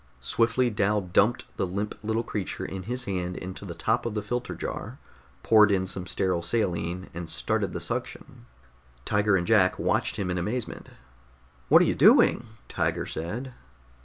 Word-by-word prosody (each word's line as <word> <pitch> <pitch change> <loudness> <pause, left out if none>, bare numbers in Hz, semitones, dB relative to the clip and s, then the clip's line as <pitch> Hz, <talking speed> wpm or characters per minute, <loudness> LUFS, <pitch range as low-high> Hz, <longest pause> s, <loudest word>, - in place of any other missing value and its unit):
Swiftly 115 - +1
Dal 105 0 +1
dumped 100 +6 +1
the 95 - 0
limp 100 +4 -3
little 110 +2 -1
creature 105 -4 -4
in 95 - -5
his 125 +1 -2
hand 90 -4 -3
into 95 +2 -7
the 85 -3 -7
top 110 +7 0
of 115 -2 -4
the 105 - -2
filter 120 +4 -3
jar, - - -5 0.5
poured 110 -2 +6
in 95 -2 +1
some 95 -1 -5
sterile 90 -1 0
saline, 90 -3 -2
and 85 -1 -6
started - - 0
the - - -4
suction. - - -6 0.6
Tiger 105 -1 +2
and 85 - -1
Jack 100 -4 +4
watched - - 0
him 95 -3 -2
in 90 - -1
amazement. 110 +6 -4 0.8
"What - - +7
are - - +3
you - - +1
doing?" 120 - +5 0.2
Tiger - - -1
said. 115 +11 -5
100 Hz, 165 wpm, -27 LUFS, 90-115 Hz, 0.8 s, What